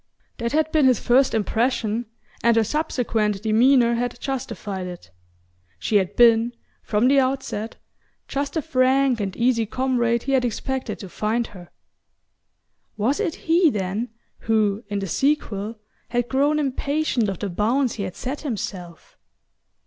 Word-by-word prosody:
That 235 0 -2
had 315 0 +1
been 300 -4 +4
his 250 -4 +3
first 255 0 +3
impression, 225 +1 0 0.3
and 235 -1 +4
her 225 - +4
subsequent 220 -7 -1
demeanour 235 +2 +4
had 240 +1 -2
justified 205 -8 -4
it. 175 - -10 0.7
She 210 - +1
had 190 0 -1
been, 235 0 +5 0.3
from 215 +3 +1
the 275 +1 +5
outset, 260 -4 -2 0.5
just 280 +1 -3
the 320 - 0
frank 260 -1 +2
and 195 -2 -4
easy 235 -2 +2
comrade 240 -1 0
he 275 - -2
had 265 -2 +3
expected 260 +2 -3
to 195 - -8
find 220 +5 -1
her. 175 -3 -12 1.3
Was 235 +7 +1
it 380 -7 -1
he, 335 +1 +5
then, 210 +1 -2 0.3
who, 215 -1 +1
in 205 -1 -3
the 195 -1 -3
sequel, 225 - -1 0.3
had 245 0 -1
grown 285 +3 +2
impatient 280 -4 0
of 195 - -3
the 200 - -4
bounds 235 +7 +1
he 205 - -4
had 185 -2 -5
set 270 +3 -5
himself? 190 - -6
235 Hz, 150 wpm, -23 LUFS, 210-265 Hz, 1.3 s, been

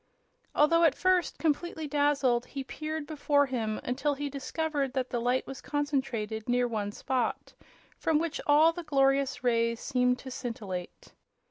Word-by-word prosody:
Although 335 +3 +4
at 295 -4 +4
first 370 -1 +2
completely 320 0 -1
dazzled, 285 -4 +2
he 275 -1 -5
peered 310 +2 -5
before 290 -1 +2
him 225 -5 -2
until 280 +4 -1
he 285 0 -4
discovered 285 0 -2
that 260 -1 -2
the 240 - -1
light 245 +2 +1
was 270 - -8
concentrated 255 -7 -2
near 245 0 +2
one 210 -3 -2
spot, 245 +1 -2 0.5
from 320 -2 +2
which 330 0 -2
all 305 +3 +6
the 350 - -5
glorious 275 -3 +1
rays 230 -1 +2
seemed 250 -2 +1
to 260 +1 -9
scintillate. 205 -8 -6
275 Hz, 150 wpm, -29 LUFS, 245-295 Hz, 0.5 s, all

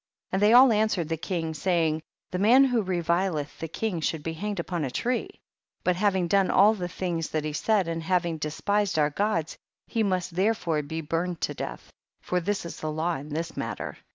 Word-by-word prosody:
5. - - -27
And 190 - +1
they 210 +1 +5
all 250 +1 +8
answered 210 -6 +1
the 165 - 0
king, 165 0 -3
saying, 160 -2 +1 0.3
the 180 - -2
man 240 +7 +6
who 245 -4 +2
revileth 175 -4 -1
the 165 - -4
king 180 +1 -3
should 155 -1 -1
be 165 - -3
hanged 205 +3 -4
upon 170 -1 -2
a 135 - -1
tree; 250 - -1 0.5
but 180 - +2
having 190 -2 +1
done 195 +1 +3
all 205 +3 +6
the 180 -5 -4
things 170 -2 -3
that 155 -1 -1
he 155 - -3
said, 200 +3 +1
and 165 0 -2
having 170 -1 0
despised 195 +5 0
our 150 -1 +3
gods, 175 -3 -1 0.3
he 230 - -1
must 185 -4 0
therefore 185 -5 +1
be 160 +3 -5
burned 165 +2 -2
to - - -1
death, - - -7 0.3
for 180 - -1
this 195 +1 -2
is 170 - -7
the 155 - -3
law 165 +3 -1
in 145 +3 -9
this 160 +2 -4
matter. - - -4
175 Hz, 210 wpm, -27 LUFS, 160-200 Hz, 0.5 s, all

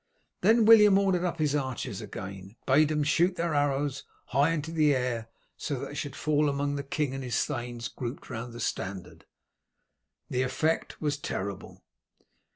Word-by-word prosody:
Then 225 0 +5
William 210 -3 +8
ordered 190 -3 +2
up 175 -2 -1
his 150 -3 +1
archers 130 -6 -3
again, 100 -1 -8
bade 145 +4 +5
them 150 -1 +1
shoot 170 +5 +2
their 170 -2 -1
arrows 145 -1 0 0.3
high 140 +4 +3
into 160 -1 -2
the 155 -3 +3
air, 120 -3 -2 0.3
so 145 - -3
that 140 +2 -5
they - - -9
should 145 -2 -4
fall 150 -1 +2
among 140 0 -1
the 140 - -2
king 140 0 -2
and 135 0 -4
his 125 -2 0
thanes 120 -1 -4
grouped 120 +3 -6
round 115 +1 -6
the 120 - -9
standard. 90 -3 -4 1.0
The 125 - -1
effect 155 +5 -1
was 150 -2 0
terrible. 100 -7 -5
140 Hz, 165 wpm, -28 LUFS, 120-155 Hz, 1.0 s, William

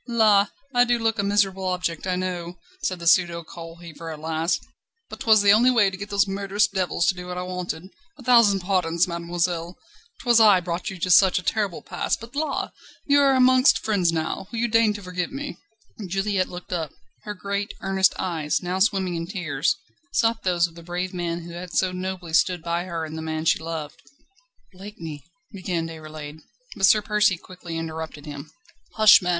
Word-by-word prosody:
"La! 215 -4 +4 0.3
I 245 0 +5
do 240 0 +2
look 225 -1 0
a - - +2
miserable 195 -1 +1
object, 180 -2 -2
I 185 - +1
know," 180 -1 -4 0.2
said 185 - -1
the 170 - -9
pseudo 170 0 +3
coal 165 0 -10
heaver 170 -1 -10
at 155 -1 -7
last, 160 +2 -1 0.5
"but - - -8
'twas 220 -2 +4
the 200 - +6
only 235 +4 +5
way 220 -6 +4
to - - -6
get 200 +2 -7
those 200 0 +2
murderous 200 +1 +1
devils 185 -3 -1
to - - +3
do 180 0 -9
what 180 0 -5
I 180 - -3
wanted. 180 -1 -5 0.3
A 265 - -13
thousand 230 -6 +5
pardons, 180 -2 +1
mademoiselle; 170 0 -2 0.5
'twas 240 -2 +5
I 210 -4 +7
brought 175 0 -4
you 190 - -7
to 180 +1 -1
such 190 +1 +6
a 180 - -2
terrible 200 -1 -1
pass, 175 - -2
but 230 +4 -12
la! 310 +2 -2 0.3
you 285 0 +4
are 275 -1 +4
amongst 255 +1 +5
friends 195 -6 +1
now. 165 +3 -3
Will 235 - -5
you 235 +1 +1
deign 230 -1 +4
to 205 -1 -8
forgive 180 -1 -3
me?" 280 +1 -6 0.5
Juliette 195 0 0
looked 180 +1 -8
up. 160 -4 -2 0.3
Her 210 -1 -6
great, 200 +1 -3
earnest 190 0 +2
eyes, 160 -4 -1
now 180 +1 -2
swimming 190 -3 +1
in 165 0 -4
tears, 170 -8 -1 0.4
sought 225 -1 +2
those 175 -2 +2
of 170 - -8
the 170 - -12
brave 180 +2 -4
man 170 -1 -3
who 170 - -9
had 175 +1 -8
so 185 -1 +2
nobly 180 -2 -5
stood 175 +1 +2
by 170 +1 -1
her 165 -3 -4
and 155 0 -8
the 160 - -5
man 160 0 -3
she - - +3
loved. 160 -2 -6 0.7
"Blakeney 170 -7 -9
..." - - -46
began 180 -4 -3
Déroulède. 155 -2 -9 0.4
But 195 - +4
Sir 215 0 +5
Percy 210 -3 +2
quickly 175 -2 -8
interrupted 160 -2 -6
him: 145 0 -8 0.5
"Hush, 215 -2 +8
man! 180 - -2
180 Hz, 200 wpm, -24 LUFS, 170-205 Hz, 0.7 s, Hush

